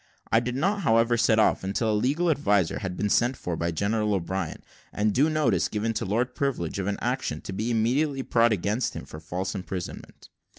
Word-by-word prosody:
I 115 Hz, -, +5 dB
did 120 Hz, +1 st, -3 dB
not, 195 Hz, +9 st, 0 dB
however, 115 Hz, -5 st, +3 dB
set 110 Hz, -1 st, +3 dB
off 110 Hz, -, +3 dB
until 100 Hz, +4 st, 0 dB
a -, -, +1 dB
legal 145 Hz, +11 st, +1 dB
adviser 100 Hz, -, +1 dB
had 90 Hz, -2 st, -4 dB
been 105 Hz, -, 0 dB
sent 120 Hz, +5 st, +2 dB
for 90 Hz, -, -3 dB
by 85 Hz, +1 st, -1 dB
General 105 Hz, +4 st, 0 dB
O'Brien; 95 Hz, -1 st, -3 dB, 0.3 s
and 105 Hz, 0 st, 0 dB
due 145 Hz, +5 st, +3 dB
notice 125 Hz, -, +2 dB
given 110 Hz, +1 st, -2 dB
to -, -, -2 dB
Lord 120 Hz, +6 st, 0 dB
Privilege 125 Hz, -, -2 dB
of 95 Hz, -, -2 dB
an 100 Hz, -, -1 dB
action 125 Hz, -10 st, -2 dB
to 95 Hz, -, -7 dB
be 110 Hz, +5 st, -2 dB
immediately 135 Hz, +5 st, +1 dB
brought 115 Hz, -1 st, +3 dB
against 105 Hz, +4 st, -1 dB
him -, -, -6 dB
for 75 Hz, +2 st, -9 dB
false 90 Hz, +4 st, -4 dB
imprisonment. 95 Hz, -2 st, -7 dB
110 Hz, 205 wpm, -26 LUFS, 95-125 Hz, 0.3 s, I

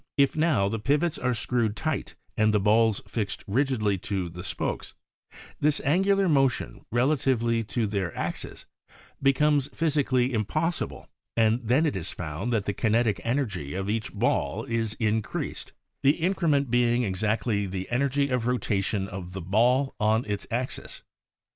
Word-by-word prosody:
If 140 Hz, -1 st, +3 dB
now 155 Hz, -11 st, +2 dB
the 110 Hz, +2 st, -2 dB
pivots 150 Hz, +8 st, +1 dB
are 125 Hz, -1 st, 0 dB
screwed 110 Hz, -1 st, 0 dB
tight 155 Hz, +2 st, -3 dB, 0.2 s
and 110 Hz, 0 st, +3 dB
the 105 Hz, -, +3 dB
balls 110 Hz, +1 st, +3 dB
fixt 100 Hz, 0 st, -3 dB
rigidly 110 Hz, -4 st, +1 dB
to 95 Hz, -2 st, -3 dB
the 90 Hz, +2 st, -8 dB
spokes, -, -, -3 dB, 0.6 s
this 150 Hz, 0 st, +2 dB
angular 195 Hz, +6 st, +3 dB
motion 135 Hz, -, +1 dB
relatively 120 Hz, -2 st, +2 dB
to 115 Hz, +2 st, -1 dB
their 100 Hz, -4 st, -2 dB
axes -, -, -4 dB, 0.6 s
becomes 140 Hz, +1 st, +3 dB
physically 135 Hz, -5 st, +1 dB
im 110 Hz, -2 st, +1 dB
possible 160 Hz, -, -2 dB, 0.3 s
and 115 Hz, +1 st, +3 dB
then 125 Hz, +8 st, +3 dB
it 150 Hz, -, 0 dB
is 90 Hz, -4 st, -4 dB
found 85 Hz, +7 st, -4 dB
that 110 Hz, -4 st, 0 dB
the 100 Hz, -, -1 dB
kinetic 115 Hz, 0 st, +1 dB
energy 105 Hz, -, -2 dB
of 95 Hz, +2 st, -2 dB
each 110 Hz, -2 st, -2 dB
ball -, -, 0 dB
is 115 Hz, -2 st, -2 dB
in 110 Hz, -1 st, +1 dB
creased, -, -, -5 dB, 0.3 s
the 140 Hz, +3 st, +4 dB
increment 160 Hz, -7 st, +1 dB
being 120 Hz, 0 st, +3 dB
exactly 105 Hz, +1 st, 0 dB
the 95 Hz, 0 st, -4 dB
energy 140 Hz, +2 st, +1 dB
of 125 Hz, -2 st, 0 dB
rotation 100 Hz, -5 st, 0 dB
of 95 Hz, -2 st, -7 dB
the 95 Hz, -, -4 dB
ball 120 Hz, +9 st, +2 dB
on 110 Hz, +3 st, +2 dB
its 105 Hz, -1 st, -4 dB
axis. 125 Hz, +2 st, -4 dB
115 Hz, 155 wpm, -27 LUFS, 105-135 Hz, 0.6 s, the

